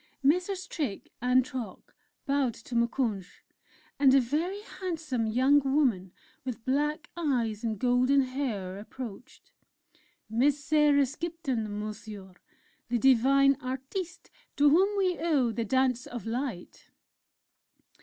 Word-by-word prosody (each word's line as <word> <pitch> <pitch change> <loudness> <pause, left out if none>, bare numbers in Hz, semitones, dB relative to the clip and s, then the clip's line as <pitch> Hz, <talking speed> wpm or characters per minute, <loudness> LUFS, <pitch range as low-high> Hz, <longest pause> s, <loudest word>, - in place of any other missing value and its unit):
Messrs. 360 +6 +1
Trick 290 - -4
and 250 +1 +3
Trock 250 -9 -7 0.3
bowed 275 -5 +1
to 235 - -11
Moukounj, 235 -5 0 0.7
and 270 -2 +6
a - - +7
very 320 - -2 0.2
handsome 310 -11 -2
young 260 +6 +4
woman 265 -10 +1 0.3
with 250 -3 -6
black 295 +4 -1
eyes 245 -10 -1
and 220 -2 -1
golden 250 +4 +3
hair 240 -8 -3
approached: 225 +1 -10 0.8
"Miss 260 +6 +2
Sarah 295 -2 +4
Skipton, 265 -8 -4
Monsieur 210 -2 -7 0.6
the 240 - +1
divine 270 +3 +4
Artiste 270 +8 -5 0.2
to 290 0 +5
whom 390 +6 +3
we 370 -3 +1
owe 295 -8 +2
the 230 +1 -3
'Dance 255 +1 +1
of 240 -5 -7
Light'." 230 -5 -5
260 Hz, 115 wpm, -29 LUFS, 230-290 Hz, 0.8 s, a